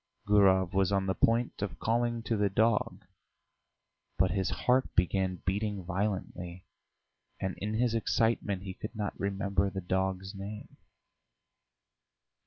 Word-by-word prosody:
Gurov 95 Hz, -2 st, +4 dB
was 95 Hz, -1 st, +2 dB
on 100 Hz, -1 st, +1 dB
the 95 Hz, -, +1 dB
point 115 Hz, +3 st, +1 dB
of 95 Hz, -5 st, -3 dB
calling 120 Hz, 0 st, 0 dB
to 115 Hz, -, 0 dB
the 105 Hz, -1 st, +2 dB
dog, 110 Hz, +2 st, +1 dB, 1.1 s
but 95 Hz, -, +3 dB
his 95 Hz, -2 st, 0 dB
heart 130 Hz, +1 st, +1 dB
began 90 Hz, 0 st, +1 dB
beating 100 Hz, +1 st, -1 dB
violently, 95 Hz, -2 st, -3 dB, 0.7 s
and 95 Hz, -1 st, -2 dB
in 105 Hz, +2 st, -2 dB
his 120 Hz, 0 st, +2 dB
excitement 110 Hz, -4 st, +1 dB
he 95 Hz, -1 st, -5 dB
could 110 Hz, +4 st, -7 dB
not 105 Hz, -1 st, -2 dB
remember 100 Hz, 0 st, 0 dB
the 95 Hz, -, -4 dB
dog's 95 Hz, +1 st, -1 dB
name. 100 Hz, +2 st, -8 dB
100 Hz, 130 wpm, -30 LUFS, 95-110 Hz, 1.1 s, Gurov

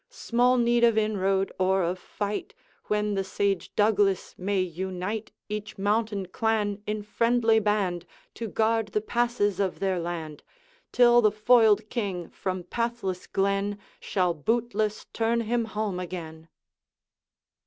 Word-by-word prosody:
Small 245 Hz, +2 st, +2 dB
need 240 Hz, 0 st, +3 dB
of 230 Hz, -2 st, +5 dB
inroad 195 Hz, -3 st, +1 dB
or 190 Hz, 0 st, +2 dB
of 180 Hz, +2 st, -1 dB
fight, 210 Hz, -, -4 dB, 0.3 s
When 210 Hz, 0 st, 0 dB
the 195 Hz, -1 st, 0 dB
sage 195 Hz, 0 st, -1 dB
Douglas 205 Hz, -3 st, +2 dB
may 195 Hz, +1 st, -1 dB
unite 185 Hz, +4 st, -3 dB, 0.2 s
Each 210 Hz, 0 st, -5 dB
mountain 205 Hz, 0 st, 0 dB
clan 210 Hz, -1 st, 0 dB
in 210 Hz, 0 st, -2 dB
friendly 230 Hz, +1 st, +2 dB
band, 195 Hz, -5 st, 0 dB, 0.3 s
To 230 Hz, -, -5 dB
guard 225 Hz, +1 st, +1 dB
the 210 Hz, -, +1 dB
passes 220 Hz, -4 st, 0 dB
of 195 Hz, -2 st, 0 dB
their 190 Hz, -2 st, 0 dB
land, 165 Hz, -3 st, -5 dB, 0.5 s
Till 240 Hz, -1 st, +6 dB
the 215 Hz, -, +5 dB
foiled 215 Hz, -1 st, +4 dB
King 195 Hz, -7 st, -3 dB
from 185 Hz, -2 st, -4 dB
pathless 230 Hz, -5 st, -3 dB
glen 200 Hz, +1 st, 0 dB, 0.2 s
Shall 180 Hz, -3 st, 0 dB
bootless 215 Hz, +4 st, -1 dB
turn 230 Hz, +1 st, +1 dB
him 230 Hz, +1 st, 0 dB
home 215 Hz, -4 st, -3 dB
again.' 165 Hz, -3 st, -7 dB
205 Hz, 130 wpm, -27 LUFS, 190-225 Hz, 0.5 s, Till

